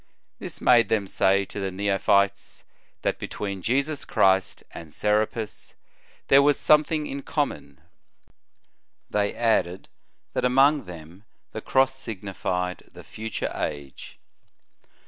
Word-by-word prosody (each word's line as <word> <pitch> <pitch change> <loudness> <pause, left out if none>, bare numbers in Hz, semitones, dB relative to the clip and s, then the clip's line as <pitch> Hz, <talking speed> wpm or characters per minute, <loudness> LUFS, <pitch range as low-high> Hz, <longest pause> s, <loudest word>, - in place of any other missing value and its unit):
This - - -7
made 120 -4 +5
them 110 -3 +1
say 95 +1 +2
to 100 - -8
the 95 -1 -2
neophytes, 100 0 0 0.4
that - - -1
between 100 -2 -5
Jesus 140 - -1
Christ 95 0 +2
and 80 -2 -10
Serapis 105 +4 -2 0.5
there 135 +1 +7
was 145 0 +3
some 150 0 +5
thing 155 -1 -2
in 140 -1 -5
common. 140 - -3 1.3
They 105 -1 0
added, 110 -6 0 0.4
that - - -1
among 135 +2 +4
them 85 +3 -12 0.3
the 110 - -6
cross 130 +2 +2
signified 95 -6 -4
the - - -13
future 110 +1 -5
age. 70 -3 -6
105 Hz, 120 wpm, -25 LUFS, 95-130 Hz, 1.3 s, there